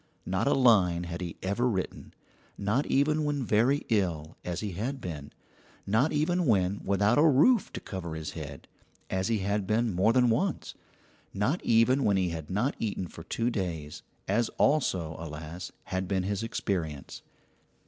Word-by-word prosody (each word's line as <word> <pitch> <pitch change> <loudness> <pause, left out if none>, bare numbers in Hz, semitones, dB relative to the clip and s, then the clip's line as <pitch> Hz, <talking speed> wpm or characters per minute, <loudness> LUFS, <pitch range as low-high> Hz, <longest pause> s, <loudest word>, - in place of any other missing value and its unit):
Not - - 0
a - - +4
line 100 -10 +4
had 85 +1 -5
he 85 -2 -5
ever 100 +7 +1
written 95 -5 -4 0.4
not 105 +8 0
even 150 +3 +2
when 145 -3 -1
very 120 +7 +2
ill, 85 -8 0
as 90 -1 -3
he 105 -2 -3
had 120 +10 -3
been; 75 - -6 0.5
not 115 +10 +2
even 165 +3 +1
when 100 -3 +2
without 100 +5 +2
a 160 - +6
roof 175 - +4
to - - -4
cover 85 -5 -6
his 80 -2 -5
head, 70 -3 -8 0.4
as 95 +1 0
he 115 - +1
had 100 -1 0
been 110 +1 +1
more 95 +6 +3
than 125 -1 +4
once; 165 - -1 0.6
not 125 - 0
even 120 +4 +4
when 100 -2 +3
he 90 -2 +1
had 80 -3 -6
not 105 +9 0
eaten 100 -4 -2
for 85 - -10
two 115 +8 -1
days, 85 -8 -4 0.3
as 110 +4 +1
also, 95 - +1
alas, 80 +2 -7
had 95 0 -3
been 95 -1 0
his 100 +1 -2
experience. 85 -10 -3
100 Hz, 170 wpm, -29 LUFS, 90-125 Hz, 0.6 s, a